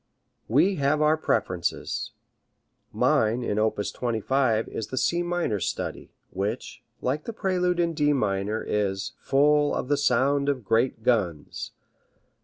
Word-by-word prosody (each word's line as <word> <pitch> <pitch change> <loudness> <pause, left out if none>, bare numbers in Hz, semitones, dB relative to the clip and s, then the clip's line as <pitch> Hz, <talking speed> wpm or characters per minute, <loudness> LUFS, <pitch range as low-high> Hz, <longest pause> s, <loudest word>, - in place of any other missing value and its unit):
We 165 - +3
have 140 +1 +2
our 155 +1 +4
preferences. 105 - -1 0.8
Mine 115 +3 +2
in 105 -2 -1
op. 110 0 +2
25 120 0 0
is 110 - -5
the 130 - -6
C 170 +6 +1
minor 175 - -1
study, - - -4 0.2
which, 100 +3 -4 0.2
like 140 +4 -1
the 230 - -5
prelude 180 -4 0
in 170 -1 +1
D 150 -2 +2
minor, 105 -4 0
is 100 -2 -1
"full 145 +1 +3
of 125 - -3
the 145 - +3
sound 140 +1 +2
of 130 -6 -2
great 115 +1 +1
guns." 100 -11 -1
130 Hz, 135 wpm, -26 LUFS, 110-150 Hz, 0.8 s, our